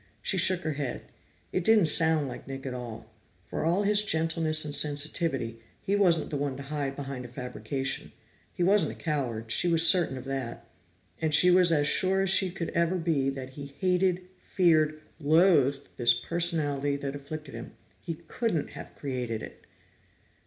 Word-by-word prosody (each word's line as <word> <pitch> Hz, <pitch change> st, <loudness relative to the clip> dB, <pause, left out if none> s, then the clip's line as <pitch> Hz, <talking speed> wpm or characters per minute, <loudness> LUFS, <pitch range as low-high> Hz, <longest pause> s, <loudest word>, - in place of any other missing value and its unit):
She 190 Hz, -, 0 dB
shook 185 Hz, 0 st, +2 dB
her 160 Hz, -, -3 dB
head; 140 Hz, -3 st, -5 dB, 0.5 s
it 185 Hz, -, -2 dB
didn't 215 Hz, -2 st, +4 dB
sound 160 Hz, -1 st, +3 dB
like 125 Hz, -, -9 dB
Nick 135 Hz, 0 st, -8 dB
at 130 Hz, -, -4 dB
all. 120 Hz, -3 st, -9 dB, 0.4 s
For -, -, -4 dB
all 175 Hz, +5 st, +1 dB
his 205 Hz, 0 st, +3 dB
gentleness 160 Hz, -4 st, +2 dB
and 145 Hz, -, -4 dB
sensitivity, 145 Hz, -5 st, +1 dB, 0.2 s
he 200 Hz, -, -2 dB
wasn't 175 Hz, -6 st, +2 dB
the 145 Hz, -, -2 dB
one 140 Hz, -2 st, -3 dB
to 140 Hz, -, -8 dB
hide 140 Hz, -1 st, -4 dB
behind 135 Hz, -2 st, -6 dB
a -, -, -8 dB
fabrication. 130 Hz, +2 st, -5 dB, 0.4 s
He 175 Hz, -, -3 dB
wasn't 200 Hz, +3 st, +3 dB
a -, -, -13 dB
coward; 120 Hz, -8 st, -4 dB
she 175 Hz, -, +2 dB
was 165 Hz, -1 st, +6 dB
certain 170 Hz, -7 st, +3 dB
of 130 Hz, -, -9 dB
that. 135 Hz, -3 st, -6 dB, 0.5 s
And 155 Hz, -1 st, +2 dB
she 180 Hz, +3 st, +6 dB
was 180 Hz, -1 st, +5 dB
as 150 Hz, -3 st, +2 dB
sure 190 Hz, +5 st, +3 dB
as 195 Hz, -, +3 dB
she 190 Hz, -1 st, +5 dB
could 175 Hz, -2 st, -5 dB
ever 170 Hz, +2 st, 0 dB
be 160 Hz, -6 st, 0 dB
that 135 Hz, -1 st, -7 dB
he 140 Hz, 0 st, -10 dB
hated, 185 Hz, -1 st, 0 dB
feared, 155 Hz, -4 st, +1 dB, 0.2 s
loathed 145 Hz, -3 st, +3 dB
this 120 Hz, -1 st, +4 dB
personality 145 Hz, -1 st, 0 dB
that 140 Hz, 0 st, -5 dB
afflicted 145 Hz, +1 st, -9 dB
him; 115 Hz, +1 st, -9 dB, 0.3 s
he 165 Hz, -2 st, -6 dB
couldn't 220 Hz, -, -2 dB
have -, -, -11 dB
created 125 Hz, -5 st, -5 dB
it. -, -, -12 dB
155 Hz, 175 wpm, -27 LUFS, 135-175 Hz, 0.5 s, was